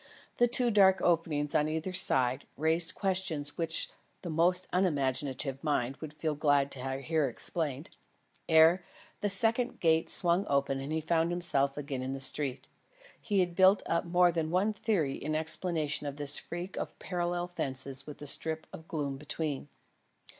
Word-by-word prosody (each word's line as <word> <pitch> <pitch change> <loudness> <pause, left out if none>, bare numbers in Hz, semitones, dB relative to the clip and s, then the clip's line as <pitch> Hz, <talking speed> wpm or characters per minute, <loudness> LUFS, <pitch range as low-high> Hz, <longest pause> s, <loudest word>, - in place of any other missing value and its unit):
The 240 - +4
two 240 0 +2
dark 195 -3 +5
openings 160 -4 +1
on 150 +1 +2
either 160 +4 -3
side, 130 -6 +2
raised 160 +2 +1
questions 180 -7 -1
which 165 -1 0 0.4
the 175 - -4
most 175 +3 +1
unimaginative 140 -5 -1
mind 135 -3 -1
would 155 -1 -9
feel 155 0 -2
glad 145 -1 +1
to 135 +1 -4
hear 155 -1 +1
explained. 150 - -4 0.6
Ere 165 +3 +5 0.4
the 205 - -1
second 230 +5 +2
gate 160 -1 +2
swung 175 +3 +4
open 140 -1 0
and 135 +2 -6
he 160 0 -1
found 165 +1 +1
himself 140 -6 +1
again 140 -3 -4
in 130 +1 -4
the 135 - -5
street, 135 0 +1 0.5
he 205 -4 +1
had 175 -1 -1
built 190 +2 +5
up 170 - 0
more 175 +1 +3
than 165 -2 -2
one 190 +5 +1
theory 195 -10 -1
in 155 +2 -4
explanation 160 -2 -1
of 140 - -5
this 145 0 +1
freak 175 +2 -7
of - - -5
parallel 175 -1 -3
fences 135 -4 -4
with 150 - -9
the 145 - -9
strip 160 +2 -1
of 160 - -10
gloom 140 -4 -3
between. 150 0 -4
160 Hz, 165 wpm, -30 LUFS, 140-175 Hz, 0.6 s, dark